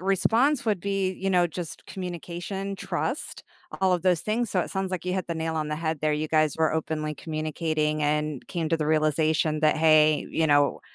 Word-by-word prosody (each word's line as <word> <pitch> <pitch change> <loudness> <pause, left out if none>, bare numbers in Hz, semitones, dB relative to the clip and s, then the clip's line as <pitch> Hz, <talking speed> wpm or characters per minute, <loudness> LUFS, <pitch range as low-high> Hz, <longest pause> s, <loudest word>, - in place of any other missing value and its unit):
response 225 +9 +2
would 215 -4 +1
be, 195 0 0
you 190 +1 -3
know, 180 -2 +4
just, 170 0 -7
communication, 185 +2 -5
trust, - - -3 0.4
all 190 -1 +3
of 175 -2 0
those 180 -3 +3
things. 220 +3 -1
So 185 - +1
it - - -4
sounds 190 -1 -2
like 185 - -3
you 180 - -1
hit 190 -2 -2
the 170 - -3
nail 160 0 -2
on 155 -1 -1
the 150 - -1
head 160 -1 -2
there. 155 0 +1
You 155 +1 -2
guys 155 -2 +2
were 160 -1 +2
openly 155 -1 -2
communicating 155 -1 -2
and 150 -2 -1
came 170 -3 -3
to 165 - +2
the 155 - -2
realization 155 +1 +2
that, 155 0 +3
"Hey, 155 -1 +4
you 160 - +1
know, 145 -1 +3
160 Hz, 210 wpm, -26 LUFS, 155-185 Hz, 0.4 s, know